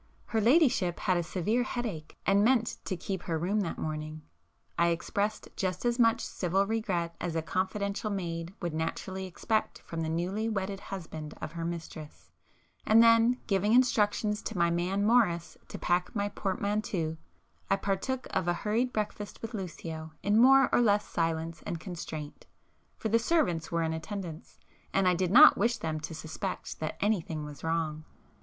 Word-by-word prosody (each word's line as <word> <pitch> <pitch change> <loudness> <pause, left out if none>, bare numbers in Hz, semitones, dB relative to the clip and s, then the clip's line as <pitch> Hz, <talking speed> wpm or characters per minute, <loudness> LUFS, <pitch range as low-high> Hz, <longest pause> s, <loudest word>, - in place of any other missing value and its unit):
Her 225 - 0
ladyship 235 - +3
had 185 -2 +2
a - - +1
severe 190 +7 0
headache 230 -11 -4
and 200 +1 +4
meant 235 -1 +2
to 185 - -2
keep 190 0 -4
her 165 -2 -2
room 190 +6 0
that 170 - -3
morning. 155 0 -4 0.5
I 170 - +3
expressed 200 +5 -1
just 185 +2 -2
as 240 +1 +1
much 230 -1 +4
civil 190 +2 0
regret 190 -6 -1
as 170 -2 -2
a 160 - 0
confidential 200 +5 -2
maid 170 -4 -3
would 170 -2 -2
naturally 185 +4 -3
expect 215 +4 -1
from 165 -1 -4
the 160 - -2
newly 185 +7 -1
wedded 195 -2 -2
husband 160 -6 -7
of - - -5
her 165 0 -5
mistress,—and 170 +6 -2
then, 230 +2 +5
giving 200 +1 +2
instructions 210 -4 +3
to 220 - -5
my 170 0 +3
man 185 +4 0
Morris 200 -8 +2
to - - -7
pack 180 +5 0
my 205 -1 0
portmanteau, 195 -4 -2 0.5
I - - +4
partook 200 +7 -2
of - - -1
a 175 - +3
hurried 225 +7 0
breakfast 210 -1 -4
with 225 +1 -5
Lucio 160 -5 -6
in 205 +2 +3
more 270 +1 +7
or - - +5
less 210 -3 +3
silence 165 -1 -2
and 170 - -4
constraint, 160 -4 -7 0.5
for 220 - -2
the 230 +2 +4
servants 210 - +1
were 170 -1 +1
in 160 0 -1
attendance, 165 -1 -6 0.3
and 195 -1 +2
I 180 - +5
did 180 0 0
not 285 - +8
wish 235 0 +2
them 155 -1 -3
to 155 +1 -6
suspect 155 0 -5
that 155 - -4
anything 170 -7 0
was 145 -1 -10
wrong. 160 -1 -1
190 Hz, 170 wpm, -30 LUFS, 165-215 Hz, 0.5 s, not